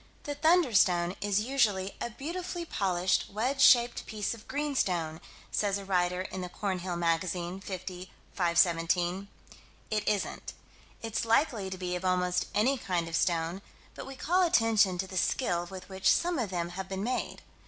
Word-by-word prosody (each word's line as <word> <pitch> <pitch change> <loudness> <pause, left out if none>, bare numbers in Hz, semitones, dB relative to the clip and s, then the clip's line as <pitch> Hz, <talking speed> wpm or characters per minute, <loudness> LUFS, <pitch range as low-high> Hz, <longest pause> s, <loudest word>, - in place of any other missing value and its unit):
The 290 - -3
"thunderstone" 240 - +3
is 205 0 +1
usually 210 -6 +1
"a - - -2
beautifully 340 +7 -5
polished, 185 - 0
wedge 250 +7 -1
shaped 240 -2 +5
piece 215 0 -2
of 225 -2 -13
greenstone," 185 - -1 0.3
says 200 -1 +1
a 200 - -8
writer 180 -1 +1
in 190 0 -6
the 180 - -5
Cornhill 185 -2 -3
Magazine, 170 +2 -1
50 185 -1 -7 0.2
517. 175 +1 +2 0.6
It 215 -1 -1
isn't: 210 -2 -2 0.5
it's 225 -1 -2
likely 225 -4 +1
to 185 - -5
be 180 -1 -3
of 180 - -5
almost 180 -1 +1
any 255 +5 +2
kind 175 -5 -1
of 165 - -3
stone, 170 +2 0 0.3
but - - -8
we 270 - -8
call 355 +7 +1
attention 225 - +3
to 190 - -2
the 190 0 -7
skill 175 -3 0
with 190 -1 -9
which 190 0 +2
some 345 -3 +1
of 225 -5 -1
them 175 -2 -2
have 190 +1 -6
been 195 0 -3
made. 250 +3 -3
190 Hz, 165 wpm, -30 LUFS, 180-230 Hz, 0.6 s, shaped